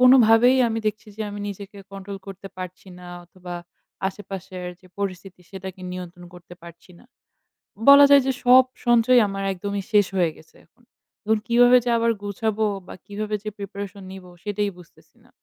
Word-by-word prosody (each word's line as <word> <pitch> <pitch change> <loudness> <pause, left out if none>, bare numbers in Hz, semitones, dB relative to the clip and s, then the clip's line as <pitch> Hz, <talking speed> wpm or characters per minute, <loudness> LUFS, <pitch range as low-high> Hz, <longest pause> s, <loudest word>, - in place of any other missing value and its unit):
কোনোভাবেই 250 0 +6
আমি 225 0 -2
দেখছি 215 0 -3
যে 220 - -3
আমি 205 0 -7
নিজেকে 200 0 -9
control 195 0 -7
করতে 195 0 -9
পারছি 185 +1 -8
না 180 - -11 0.2
অথবা 180 0 -10 0.5
আশেপাশের 190 -2 -8
যে 185 - -19
পরিস্থিতি 190 -2 -5
সেটাকে 190 -1 -8
নিয়ন্ত্রণ 180 -1 -8
করতে 175 0 -13
পারছি 170 +2 -14
না। - - -20 0.9
বলা 280 0 +10
যায় 280 -1 +7
যে 265 - +1
সব 255 +1 +8 0.2
সঞ্চয় 240 +1 +5
আমার 195 0 -4
একদমই 200 +1 -4
শেষ 205 -2 +4
হয়ে 170 -3 +2
গেছে 160 - -20
এখন। 245 - -32 0.4
এখন 220 +1 +2
কিভাবে 245 +1 +6
যে - - 0
আবার 230 0 +2
গুছাব 205 +1 -2 0.3
বা - - -9
কিভাবে 210 +1 -3
যে 215 - -3
preparation 200 0 -7
নিব 190 -1 -10 0.2
সেটাই 205 0 -1
বুঝতেছি 175 - -20
না। - - -23
200 Hz, 165 wpm, -23 LUFS, 185-225 Hz, 0.9 s, বলা